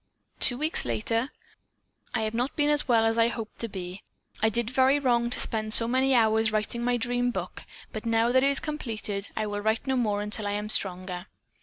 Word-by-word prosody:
"Two 245 - +6
weeks 310 +4 +1
later: 225 - -1 0.9
'I 225 - 0
have 215 0 -2
not 245 +4 -2
been 295 0 +2
as 295 -2 +1
well 230 -3 +3
as 225 +1 +1
I 230 - +5
had 235 - -1
hoped 225 -2 -7
to 230 - -2
be. 185 -1 -7 0.4
I 220 - +3
did 235 +1 -2
very 265 +2 +3
wrong 240 -4 +1
to 245 - +3
spend 215 -2 -1
so 230 - +6
many 260 +2 +2
hours 220 -1 +3
writing 215 +2 -2
my 245 0 +1
dream 245 +1 -1
book, 245 - -5 0.3
but 215 - -5
now 230 +1 +1
that 260 +1 +3
it 275 - +4
is 280 - +2
completed 220 -9 -4
I 215 - 0
will 205 -1 -3
write 220 +2 0
no 265 -1 0
more 210 -4 0
until 210 0 -3
I 205 - -2
am 210 +1 -4
stronger. 185 -2 -3
230 Hz, 220 wpm, -27 LUFS, 215-245 Hz, 0.9 s, Two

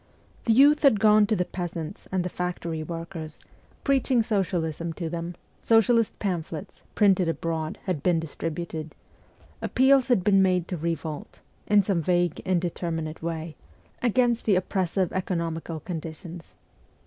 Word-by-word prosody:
The 225 - +4
youth 285 +5 +6
had 270 -8 +5
gone 210 -1 +5
to 215 - +2
the 180 -2 0
peasants 175 -1 -6
and 185 -2 0
the - - -1
factory 170 -3 -3
workers, 165 -1 -6 0.4
preaching 265 -3 +2
socialism 170 -6 -1
to 165 -1 -5
them; 170 0 -4 0.2
socialist 225 0 +3
pamphlets, 170 -5 -4
printed 190 -5 +4
abroad, 165 -1 -2
had 180 -7 -2
been 175 0 +2
distributed; 160 0 -5 0.7
appeals 265 0 +4
had 240 -8 +3
been 195 0 +5
made 180 -2 +2
to 180 - -2
revolt 160 -2 -4 0.3
in 205 -1 +5
some 190 -3 0
vague, 175 0 +1
indeterminate 170 -3 -2
way 165 -1 -4 0.5
against 240 0 +2
the 205 - +4
oppres 185 0 0
sive 185 -1 0
economical 165 -3 -2
conditions. 165 +1 -8
175 Hz, 135 wpm, -26 LUFS, 165-205 Hz, 0.7 s, youth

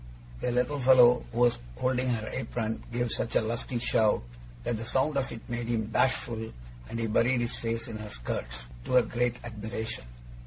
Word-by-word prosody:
The - - -1
little 125 +4 +1
fellow, 125 -2 +7
who 120 - -1
was 120 - +4 0.2
holding 130 0 +1
her 110 -3 -1
apron, 115 -1 -3
gave 120 0 0
such 115 - -1
a - - +5
lusty 115 +2 -2
shout, 110 - +2 0.4
that 120 - -1
the 115 - -5
sound 130 +5 +1
of 135 -1 0
it 115 - -9
made 120 -1 -3
him 115 -2 0
bashful, 115 -1 0 0.4
and 115 - -4
he 115 - 0
buried 120 +3 +3
his 120 0 -1
face 115 0 -2
in 110 -2 -6
her 105 0 -6
skirts, - - -4 0.2
to - - -3
her 125 -1 +7
great 120 +2 0
admiration. 110 - -4
120 Hz, 190 wpm, -29 LUFS, 110-125 Hz, 0.4 s, fellow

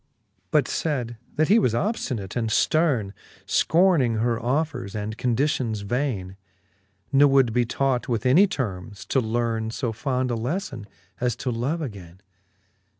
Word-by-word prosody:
But 150 -4 +3
fayd, 125 -7 -2 0.2
that 155 0 +2
he 215 +3 +6
was 120 - +1
obftinate 125 - -2
and 115 -2 0
fterne, 130 -9 +2 0.3
Scorning 165 -9 +3
her 115 +1 0
offers 125 -5 -1
and 105 +1 -4
conditions 120 -3 0
vaine: 100 -4 -2 0.8
Nc 140 +1 +6
would 135 -4 +4
be 120 0 +2
taught 130 0 0
with 115 -1 -1
any 170 +11 +6
termes^ 105 - -5
to 135 - +3
lerne 115 -1 -1
So 115 0 -3
fond 125 +1 -1
a - - 0
lefTon, 130 - -3 0.3
as 125 -2 0
to 125 - -3
love 135 +8 -2
againe. 95 - -8
120 Hz, 145 wpm, -24 LUFS, 110-140 Hz, 0.8 s, he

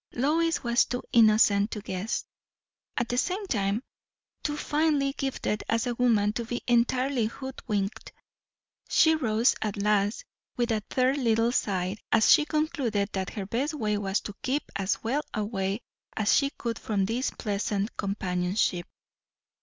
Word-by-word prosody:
Lois 325 +6 +1
was 235 0 +3
too 245 +1 -4
innocent 215 -2 +5
to 215 - -5
guess; 195 +1 -3 0.7
at 240 - 0
the 245 - +1
same 380 +7 -1
time 205 - 0 0.6
too 295 0 -2
finely 295 -3 +1
gifted 265 -7 -2
as 230 +1 +1
a 245 - -1
woman 225 -4 +2
to 235 - -2
be 240 +1 -3
entirely 245 0 +2
hoodwinked. 220 -5 -4 0.8
She 320 -1 +5
rose 235 -5 +2
at 210 -2 -2
last 205 0 +1 0.3
with 240 -1 +1
a 215 -1 +1
third 260 +2 +2
little 230 -1 +2
sigh, 190 -4 -1
as 220 -1 +5
she 300 - +6
concluded 285 -10 0
that 190 -1 -2
her 200 -3 -4
best 265 - -1
way 215 -6 0
was 200 -1 -1
to 205 - -7
keep 275 +3 0
as 195 0 -1
well 260 +7 0
away 205 -1 -2 0.4
as 215 -1 +3
she 275 - +3
could 235 -4 -5
from 200 -3 0
this 235 +6 -1
pleasant 205 0 -2
companionship. 180 -2 -1
230 Hz, 150 wpm, -27 LUFS, 205-260 Hz, 0.8 s, she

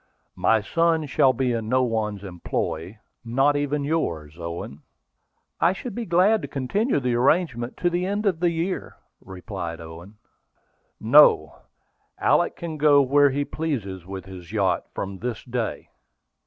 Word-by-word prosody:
"My 110 -1 +4
son 165 +6 +1
shall 130 0 +3
be 130 0 -1
in 115 -2 -3
no 130 +1 +3
one's 110 -4 -2
employ, 90 0 -4 0.3
not 135 +5 +2
even 145 0 -1
in - - -3
yours, 80 - -2
Owen." 85 -3 -7 0.8
"I 170 +2 +3
should 235 +4 -7
be 235 +2 -4
glad 190 +6 +3
to - - -5
continue 170 - 0
the 125 -2 -1
arrangement 125 -1 +1
to 175 - +1
the 175 +1 -1
end 205 +2 -2
of 185 -5 +1
the 175 0 +2
year," 170 +3 -3 0.3
replied 95 -3 -6
Owen. 85 +5 -11 0.8
"No; 110 - +5 0.6
Alick - - +2
can 165 -2 -6
go 145 -1 +5
where 145 +2 +4
he 140 +2 -1
pleases 115 - -4
with 95 0 -8
his 90 -2 -11
yacht 100 -4 0
from 95 -1 -5
this 120 -2 -4
day. 120 -2 -4
125 Hz, 155 wpm, -24 LUFS, 95-160 Hz, 0.8 s, No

